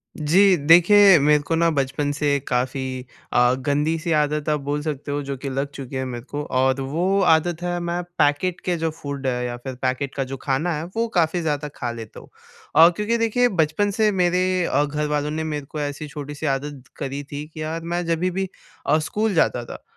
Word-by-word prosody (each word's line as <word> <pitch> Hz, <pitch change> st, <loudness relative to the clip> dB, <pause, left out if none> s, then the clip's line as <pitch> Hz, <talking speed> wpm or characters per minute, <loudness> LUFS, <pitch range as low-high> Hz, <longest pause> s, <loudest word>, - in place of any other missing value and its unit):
जी। 185 Hz, +6 st, +4 dB
देखिए 175 Hz, +5 st, +7 dB
मेरे 150 Hz, +1 st, +4 dB
को 165 Hz, -, +1 dB
ना 165 Hz, +1 st, +3 dB
बचपन 140 Hz, 0 st, -1 dB
से 145 Hz, -1 st, +1 dB
काफ़ी 130 Hz, 0 st, -2 dB, 0.3 s
अ, 125 Hz, 0 st, +4 dB
गंदी-सी 155 Hz, +4 st, 0 dB
आदत 150 Hz, 0 st, -1 dB
आप 150 Hz, -1 st, +1 dB
बोल 145 Hz, +1 st, -2 dB
सकते 145 Hz, -2 st, -4 dB
हो 145 Hz, 0 st, -1 dB
जो 140 Hz, 0 st, -4 dB
कि 140 Hz, +2 st, -5 dB
लग 135 Hz, +2 st, -2 dB
चुकी 135 Hz, -1 st, -7 dB
है 130 Hz, 0 st, -2 dB
मेरे 120 Hz, -2 st, -6 dB
को 145 Hz, 0 st, -3 dB, 0.2 s
और 130 Hz, +1 st, +2 dB
वो 175 Hz, +9 st, 0 dB
आदत 165 Hz, +1 st, 0 dB
है 175 Hz, 0 st, -1 dB
मैं 175 Hz, 0 st, -2 dB, 0.2 s
पैकेट 145 Hz, +5 st, +1 dB
के 180 Hz, -, +1 dB
जो 165 Hz, 0 st, -1 dB
फूड 140 Hz, -2 st, -4 dB
है 125 Hz, -1 st, -1 dB
या 120 Hz, 0 st, -4 dB
फ़िर 130 Hz, +1 st, -7 dB
पैकेट 130 Hz, +1 st, -2 dB
का 135 Hz, -, 0 dB
जो 135 Hz, +1 st, -6 dB
खाना 145 Hz, +6 st, +1 dB
है 150 Hz, -, -4 dB
वो 230 Hz, +1 st, +1 dB
काफ़ी 170 Hz, +1 st, +2 dB
ज़्यादा 150 Hz, -2 st, -1 dB
खा 120 Hz, -, -3 dB
लेता 115 Hz, -2 st, -9 dB
हूँ। -, -, -16 dB, 0.5 s
और 165 Hz, +2 st, +8 dB
क्योंकि 210 Hz, +6 st, -1 dB
देखिए 230 Hz, +2 st, +2 dB
बचपन 180 Hz, +2 st, +1 dB
से 215 Hz, +1 st, +2 dB
मेरे 180 Hz, 0 st, +1 dB
अ, 145 Hz, -, +2 dB
घर 150 Hz, +1 st, -2 dB
वालों 150 Hz, 0 st, -1 dB
ने 160 Hz, +1 st, -2 dB
मेरे 150 Hz, -2 st, -4 dB
को 150 Hz, -, -7 dB
ऐसी 145 Hz, +1 st, -4 dB
छोटी-सी 145 Hz, -1 st, -7 dB
आदत 140 Hz, 0 st, -2 dB
करी 140 Hz, +1 st, -4 dB
थी 145 Hz, +1 st, -7 dB
कि 155 Hz, -, -7 dB
यार 160 Hz, +2 st, -3 dB
मैं 175 Hz, +1 st, -2 dB
जभी 170 Hz, +2 st, 0 dB
भी 190 Hz, +1 st, -2 dB, 0.4 s
अ, 150 Hz, -, +4 dB
स्कूल 210 Hz, +7 st, -1 dB
जाता 125 Hz, -7 st, +2 dB
था -, -, -10 dB
150 Hz, 215 wpm, -22 LUFS, 140-175 Hz, 0.5 s, और